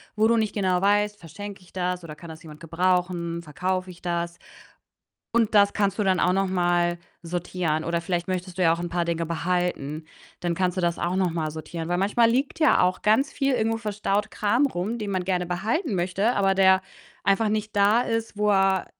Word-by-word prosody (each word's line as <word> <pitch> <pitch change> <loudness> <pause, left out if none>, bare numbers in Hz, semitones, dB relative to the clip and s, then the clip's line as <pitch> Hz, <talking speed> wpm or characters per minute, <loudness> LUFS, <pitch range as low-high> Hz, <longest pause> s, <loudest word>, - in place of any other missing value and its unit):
wo 215 +1 +3
du 235 - +3
nicht 220 -2 0
genau 185 -3 +1
weißt: 205 +1 +2
„Verschenke 200 +5 -9
ich 180 - -20
das 180 -1 -2
oder 155 -2 -8
kann 170 +1 -11
das 160 0 -10
jemand 155 -3 -12
gebrauchen, 170 0 -1
verkaufe 185 +4 -3
ich 175 - -16
das?“ 170 -1 -3 1.0
Und 225 -2 +2
das 200 0 +5
kannst 200 0 0
du 210 - +1
dann 185 -2 +2
auch 180 - +3
noch 195 +1 +1
mal 175 -1 +1 0.2
sortieren 170 -2 -2
oder 170 0 -1
vielleicht 175 0 -2
möchtest 185 0 -3
du 185 - +2
ja 165 - +5
auch 170 - -1
'n 175 - -3
paar 170 0 -1
Dinge 170 -1 -2
behalten. 170 -3 -2 0.4
Dann 175 -1 -1
kannst 180 0 0
du - - 0
das 170 -1 0
auch 175 +2 -1
noch 185 -2 +1
mal 160 -2 -2
sortieren, 160 +1 -6
weil 175 0 0
manchmal 225 +4 +3
liegt 275 +7 -1
ja 305 -11 +5
auch 180 0 +1
ganz 220 +6 +3
viel- 275 -2 +1
irgendwo 225 -1 +1
verstaut- 210 -1 -1
Kram 235 +7 +2
rum, 220 0 -3
den 210 -2 -4
man 185 -2 -1
gerne 180 -1 0
behalten 210 - -1
möchte, 190 +7 0
aber 195 -1 +3
der 190 0 +5 0.4
einfach 200 +3 +3
nicht 215 0 -2
da 205 +4 +4
ist, 225 -3 -3
wo 210 0 +2
er 195 -1 +2
185 Hz, 210 wpm, -25 LUFS, 175-205 Hz, 1.0 s, das